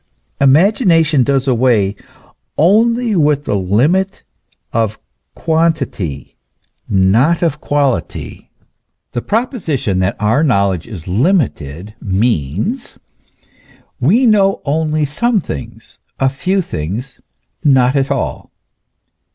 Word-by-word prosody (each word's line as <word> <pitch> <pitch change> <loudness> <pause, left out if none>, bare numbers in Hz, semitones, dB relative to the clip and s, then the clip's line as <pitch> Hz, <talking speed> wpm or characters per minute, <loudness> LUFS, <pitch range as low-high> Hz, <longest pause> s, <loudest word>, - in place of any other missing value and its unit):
Imagination 165 - +3
does 135 +1 +1
away 115 -6 +2 0.6
only 225 +6 +3
with 150 -3 +2
the - - -1
limit 140 - +1 0.5
of 110 -2 0 0.4
quantity, 155 - -1 0.5
not 110 - +3
of 150 -3 -1
quality. 140 - -2 0.6
The 120 - -3
proposition 165 - -1
that 95 +1 0
our 110 +7 +2
knowledge 100 - +1
is 95 -8 -9
limited, 105 - -1
means: 105 - -2 1.0
we 210 - +3
know 200 -4 +3
only 155 +1 0
some 215 - 0
things, 80 - -8 0.2
a 135 - +3
few 185 +8 -1
things, 105 - -6 0.4
not 130 -4 +4 0.2
all. 140 -2 -3
135 Hz, 95 wpm, -15 LUFS, 105-170 Hz, 1.0 s, not